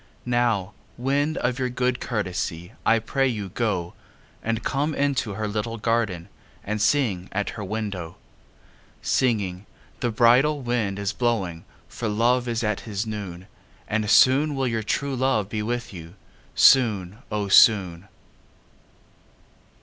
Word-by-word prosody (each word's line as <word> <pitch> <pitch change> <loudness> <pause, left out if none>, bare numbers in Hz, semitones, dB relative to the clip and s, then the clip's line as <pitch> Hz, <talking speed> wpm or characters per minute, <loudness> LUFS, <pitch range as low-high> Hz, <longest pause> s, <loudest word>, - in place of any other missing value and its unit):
Now, 120 -5 0 0.2
wind, 140 +5 0
of 125 +2 -1
your 130 -1 0
good 125 0 -1
courtesy 95 -5 -3 0.2
I 115 - +5
pray 135 +4 0
you 105 -6 -3
go, 95 -5 -2 0.5
And 115 0 -2
come 145 +5 -1
into 135 -7 0
her 110 0 -2
little 105 +2 -3
garden 110 -6 -1 0.4
And 105 +1 -3
sing 110 -7 +1
at 105 +1 -2
her 105 - -7
window; 100 -5 -4 0.9
Singing: 105 -7 0 0.3
The 120 - 0
bridal 125 +6 +3
wind 115 -5 -1
is 100 0 -2
blowing 100 -9 -1 0.2
For 115 - -5
Love 120 +4 +1
is 115 -1 -1
at 105 -2 0
his 105 -1 -4
noon; 100 -5 -6 0.4
And 105 -1 -1
soon 135 +8 +5
will 135 -1 0
your 115 -2 -1
true 135 +6 -2
love 125 -6 0
be 110 -1 -3
with 120 +1 -3
you, 85 0 -10 0.4
Soon, 105 -7 +4
O 105 -1 -1
soon. 100 -4 +5
110 Hz, 135 wpm, -24 LUFS, 100-125 Hz, 0.9 s, I